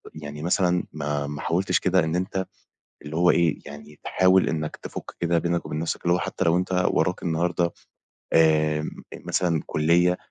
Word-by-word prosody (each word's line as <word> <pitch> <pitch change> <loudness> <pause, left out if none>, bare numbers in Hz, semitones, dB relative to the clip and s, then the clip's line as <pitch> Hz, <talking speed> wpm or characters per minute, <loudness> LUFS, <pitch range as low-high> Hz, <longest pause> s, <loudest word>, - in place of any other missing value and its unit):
يعني 75 -1 -7
مثلًا 90 0 +2
ما 75 -1 -2
ما 75 0 -6
حاولتش 90 +3 +1
كده 95 0 +2
إن 80 +1 -1
أنت 95 +1 -2 0.6
اللي 75 +1 -6
هو 90 +1 +4
إيه، 85 -3 +2
يعني 75 +1 -11
تحاول 95 0 +3
إنّك 75 -1 -3
تفُك - - -8
كده 85 0 +2
بينك 85 +1 -1
وبين 75 - -4
نَفْسك 80 +1 -3
اللي 85 0 +3
هو - - +1
حتّي - - -2
لو 85 0 +3
أنت 90 0 +1
وراك 90 - 0
النهاردة 85 +1 0 0.7
آمم، 75 -1 +2
آآ، - - -9
مثلًا 85 -4 +1
كُلّية 85 +3 +2
85 Hz, 175 wpm, -25 LUFS, 75-90 Hz, 0.7 s, هو